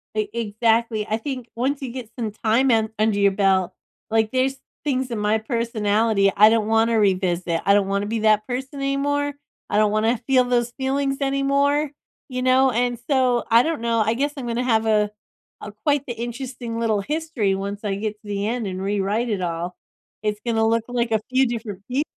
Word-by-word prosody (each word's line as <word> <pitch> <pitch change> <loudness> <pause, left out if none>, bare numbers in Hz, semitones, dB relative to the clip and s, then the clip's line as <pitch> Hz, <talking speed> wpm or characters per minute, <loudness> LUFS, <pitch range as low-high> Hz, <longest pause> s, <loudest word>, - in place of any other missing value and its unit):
E 215 -1 0
exactly. 225 0 0
I 220 - 0
think, 255 -1 -5
once 270 +4 -1
you 260 - -4
get 245 -3 -7
some 225 -3 -2
time 235 +5 +3
in 220 -1 +2
under 215 -1 +2
your 200 -1 +4
belt, 190 -2 +2 0.4
like, 220 -1 +2
there's 265 +1 +1 0.3
things 260 -3 -1
in 230 - -2
my 210 +1 +1
personality 220 -3 +1
I 210 +2 +7
don't 220 -1 +1
wanna 225 0 +3
revisit. 185 -4 +1
I 200 - +5
don't 200 -1 +3
wanna 200 +1 -1
be 225 +2 -2
that 215 -1 +3
person 265 +3 -4
anymore. 285 +1 0 0.4
I - - 0
don't 210 -1 +3
wanna 225 +3 +2
feel 260 -2 +5
those 240 -1 0
feelings 275 +1 0
anymore, 280 +1 +1 0.4
you 255 -1 -3
know? 260 +1 +4
And 245 0 0
so, 255 -3 +2
I 230 +1 +6
don't 320 -5 -2
know, 230 -1 +1
I 220 - +2
guess 285 +5 -1
I'm 255 - -5
gonna 235 +1 -1
have 225 -3 +2
a 210 -1 +2 0.5
a 210 - -7
quite 290 -2 +2
the 240 - -4
interesting 240 0 -5
little 220 -3 +1
history 290 -8 -1
once 200 +2 -5
I 195 -1 0
get 210 +1 -3
to 215 - -16
the 200 0 -2
end 230 -1 -2
and 185 0 -4
rewrite 205 +4 -1
it 205 -4 -1
all. 175 0 -3 0.4
It's 210 0 -2
gonna 225 -1 +2
look 230 0 +2
like 240 -1 -1
a 220 -1 +2
few 260 +1 +3
different 220 -5 -5
peop 265 +4 +1
230 Hz, 200 wpm, -22 LUFS, 210-255 Hz, 0.5 s, I